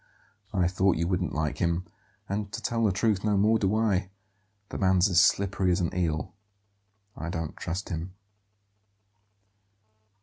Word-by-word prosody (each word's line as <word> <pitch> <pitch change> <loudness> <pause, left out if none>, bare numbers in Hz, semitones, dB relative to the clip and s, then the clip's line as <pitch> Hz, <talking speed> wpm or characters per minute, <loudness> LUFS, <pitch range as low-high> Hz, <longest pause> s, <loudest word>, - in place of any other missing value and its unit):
"I 90 -4 +2
thought 95 0 +2
you 85 +1 0
wouldn't 90 -4 -1
like 75 -1 -2
him; 85 +1 0 0.4
and, 100 0 -3
to - - -3
tell 115 -1 -1
the 105 - +3
truth, 100 +1 +1
no 105 -2 +2
more 110 +3 +3
do 100 +1 +1
I. 100 -4 +1 0.6
The - - -5
man's 95 -1 +4
as 90 -1 +5
slippery 95 -1 +2
as 85 - +2
an 85 -2 -2
eel; 80 -4 -1 0.8
I 85 - -5
don't 80 -2 -4
trust 90 +5 -4
him." 90 +1 -5
95 Hz, 155 wpm, -27 LUFS, 85-100 Hz, 0.8 s, as